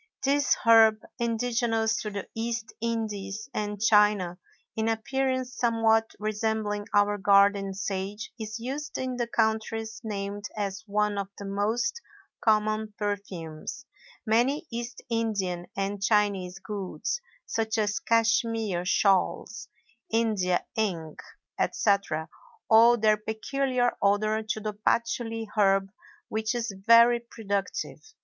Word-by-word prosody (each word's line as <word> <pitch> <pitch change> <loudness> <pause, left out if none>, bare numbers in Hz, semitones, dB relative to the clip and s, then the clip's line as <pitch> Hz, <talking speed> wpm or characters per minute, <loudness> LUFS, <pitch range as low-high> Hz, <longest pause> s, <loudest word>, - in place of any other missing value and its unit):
This 285 +1 +3
herb, 220 -1 +6 0.2
indigenous 230 -1 0
to 210 - -3
the 200 -2 -5
East 225 -1 -3
Indies 220 -3 -3
and 210 -1 -3
China, 210 -4 +3 0.4
in 220 0 0
appearance 255 +2 -1
somewhat 225 -1 +2
resembling 215 -1 -2
our 205 0 +3
garden 200 0 +4
sage, 200 +1 -4
is 220 +1 -5
used 275 +6 -4
in 255 -1 -3
the 240 -1 -1
countries 220 0 -1
named 205 -1 -4
as 200 0 -3
one 210 0 0
of 200 - -3
the 200 - -7
most 215 - -1 0.4
common 215 -1 +1
perfumes; 200 - -5 0.4
many 250 +9 +2
East 235 +2 -6
Indian 205 -7 -1
and 195 0 -2
Chinese 200 -3 +1
goods 195 - -4 0.2
(such 225 0 -1
as 210 +3 0
Cashmere 225 -5 +1
shawls, 195 +3 +1 0.4
India 215 -6 +1
ink, 175 -9 -2 0.4
etc.) 195 -7 +1 0.4
owe 230 +2 +8
their 215 -2 +3
peculiar 245 +4 -1
odor 215 +2 +2
to 215 0 -3
the 215 0 -4
patchouly 225 +1 -1
herb 195 -2 +3 0.4
which 220 +2 -2
is 230 -3 -2
very 235 +1 +7
productive. 205 -4 -4
215 Hz, 115 wpm, -27 LUFS, 200-230 Hz, 0.4 s, owe